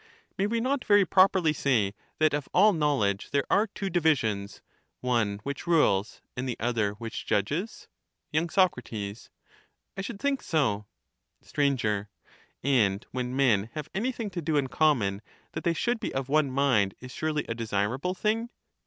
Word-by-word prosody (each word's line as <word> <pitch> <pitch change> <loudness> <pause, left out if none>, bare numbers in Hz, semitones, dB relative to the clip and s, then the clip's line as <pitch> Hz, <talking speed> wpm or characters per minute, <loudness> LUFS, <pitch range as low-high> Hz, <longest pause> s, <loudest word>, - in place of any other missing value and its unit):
May 195 +1 0
we 230 +2 0
not 260 +3 0
very 205 -2 +5
properly 185 -2 +4
say, 115 -10 +1 0.2
that 155 -1 +3
of 145 -1 -2
all 210 +3 +6
knowledge, 140 - 0
there 140 -1 +1
are 210 +3 +4
two 200 -1 -5
divisions— 125 - 0 0.4
one 115 -5 0
which 140 +5 -5
rules, 110 - +2
and 130 +1 -3
the 120 - -3
other 110 -3 0
which 115 +1 -7
judges? 150 - -1 0.5
Y. 155 +2 +2
Soc. 185 0 +4 0.2
I 105 - -9
should 195 +1 -6
think 280 +1 0
so. 105 -10 0 0.6
Str. - - -3 1.0
And 110 -7 +2
when 125 0 -3
men 115 -6 +3
have 150 -1 -5
anything 230 +1 -2
to 175 -1 -4
do 155 -1 0
in 135 -2 0
common, 115 -11 +2 0.3
that - - -5
they 170 - +2
should 240 +6 0
be - - -3
of 135 0 -2
one 150 -1 +3
mind 130 -8 +2
is 125 0 -10
surely 155 +2 -2
a 115 - -2
desirable 115 - -1
thing 225 +4 0
140 Hz, 160 wpm, -28 LUFS, 110-180 Hz, 1.0 s, all